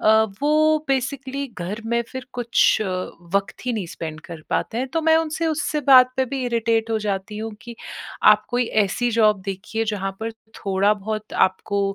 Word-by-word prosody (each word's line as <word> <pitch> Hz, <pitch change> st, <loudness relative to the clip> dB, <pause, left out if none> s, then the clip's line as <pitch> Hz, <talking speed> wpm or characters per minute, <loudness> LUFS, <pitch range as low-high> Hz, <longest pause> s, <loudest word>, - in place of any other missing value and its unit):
अ, 220 Hz, +1 st, +5 dB, 0.2 s
वो 310 Hz, +1 st, +4 dB
बेसिकली 270 Hz, +1 st, -2 dB
घर 195 Hz, +6 st, -4 dB
में 235 Hz, +1 st, +1 dB
फ़िर 260 Hz, -1 st, -7 dB
कुछ 240 Hz, -2 st, +3 dB, 0.5 s
वक़्त 200 Hz, +5 st, -1 dB
ही 250 Hz, -, +1 dB
नहीं 205 Hz, -5 st, -3 dB
स्पेंड 155 Hz, -2 st, -6 dB
कर 165 Hz, -3 st, -9 dB
पाते 225 Hz, -, -1 dB
हैं। 260 Hz, +2 st, -2 dB
तो 325 Hz, +6 st, -1 dB
मैं 320 Hz, 0 st, +5 dB
उनसे 325 Hz, 0 st, -1 dB
उससे 305 Hz, -1 st, -1 dB
बात 255 Hz, -1 st, +8 dB
पे 265 Hz, -, +2 dB
भी 265 Hz, +1 st, -3 dB
इरिटेट 230 Hz, -1 st, 0 dB
हो 220 Hz, -, +1 dB
जाती 205 Hz, 0 st, -3 dB
हूँ 220 Hz, +1 st, -4 dB
कि 235 Hz, -1 st, -9 dB, 0.6 s
आप 210 Hz, 0 st, 0 dB
कोई 245 Hz, 0 st, +1 dB, 0.2 s
ऐसी 240 Hz, +5 st, -1 dB
जॉब 210 Hz, -3 st, +4 dB
देखिए 220 Hz, +3 st, -3 dB
जहाँ 195 Hz, -1 st, -2 dB
पर 225 Hz, +1 st, -2 dB, 0.3 s
थोड़ा 200 Hz, +1 st, +3 dB
बहुत 215 Hz, +1 st, -5 dB, 0.2 s
आपको 200 Hz, +2 st, -4 dB
225 Hz, 180 wpm, -22 LUFS, 205-260 Hz, 0.6 s, बात